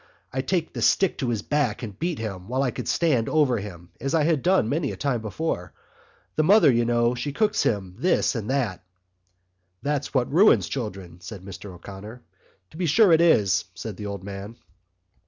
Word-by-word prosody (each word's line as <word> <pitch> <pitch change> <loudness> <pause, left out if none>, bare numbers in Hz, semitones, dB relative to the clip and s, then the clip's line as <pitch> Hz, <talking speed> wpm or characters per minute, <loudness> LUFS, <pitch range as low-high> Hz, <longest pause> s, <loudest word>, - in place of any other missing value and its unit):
I'd 130 0 -3
take 175 -4 -1
the - - -5
stick 195 -3 +2
to 130 - -1
his 110 -4 -2
back 140 -7 0
and 105 -4 -7
beat 170 -2 -1
him 95 -5 -6
while 130 +3 0
I 125 - 0
could - - -6
stand 140 -10 +1
over 140 -7 +2
him—as 100 - -5
I 160 +1 +3
done 170 - +2
many 145 +3 -1
a - - -7
time 135 -5 -1
before. 110 - -3 0.6
The 155 - +4
mother, 195 -2 +6
you 120 -1 +2
know, 120 0 +2
she 140 +4 -3
cocks 215 +6 +1
him 100 -4 0
up - - -16
with - - -16
this 180 - +2
and 115 -4 -4
that...." 120 -10 -1 1.0
"That's 145 -1 -1
what 130 0 0
ruins 195 +7 +5
children," 95 -9 -6
said 100 0 -9
Mr 95 +1 -9
O'Connor. 105 +6 -10 0.5
"To - - -13
be 180 -1 -1
sure 195 +5 +5
it 165 0 +5
is," 100 - +3
said 100 +3 -6
the 105 +1 -6
old 100 -2 -6
man. 100 +3 -7
120 Hz, 195 wpm, -25 LUFS, 100-155 Hz, 1.0 s, mother